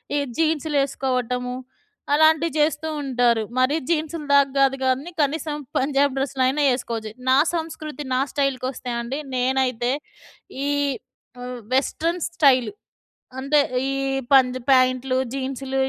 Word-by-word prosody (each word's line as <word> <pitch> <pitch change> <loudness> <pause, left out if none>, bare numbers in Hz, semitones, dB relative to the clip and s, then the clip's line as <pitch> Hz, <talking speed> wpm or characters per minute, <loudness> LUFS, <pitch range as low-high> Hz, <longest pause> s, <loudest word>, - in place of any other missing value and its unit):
ఈ - - +2 0.2
జీన్సులేసుకోవటము, 270 -6 0 0.6
అలాంటివి 315 +2 +4
చేస్తూ 305 +1 +1 0.2
ఉంటారు. 245 -4 +2 0.2
మరి 255 +4 +3
జీన్సులు 315 -1 -1
దాకా 280 -1 +5
గాదు 270 0 +3
గానీ 265 +7 0
కనీసం 300 +1 -1 0.2
పంజాబి 275 0 +1
డ్రస్సులైనా 270 +1 +1
ఏసుకోవచ్చు. 225 -3 -4 0.2
నా 260 - +5 0.2
సంస్కృతి, 310 -2 -5
నా 260 - +2
స్టైల్‌కొస్తే 260 -3 -2
అండి 260 +5 -4 0.2
నేనైతే 255 -1 +1 0.8
ఈ - - +1 0.7
ఆహ్, 250 0 -6 0.2
వెస్ట్రన్ 330 +5 0
స్టైలు 270 - +3 0.7
అంటే, 285 +2 +2 0.3
ఈ - - -1 0.4
పంజ్ 255 -1 +5
ప్యాంట్లు, 255 0 +3 0.2
జీన్సులు 270 0 -3
270 Hz, 110 wpm, -23 LUFS, 255-295 Hz, 0.8 s, దాకా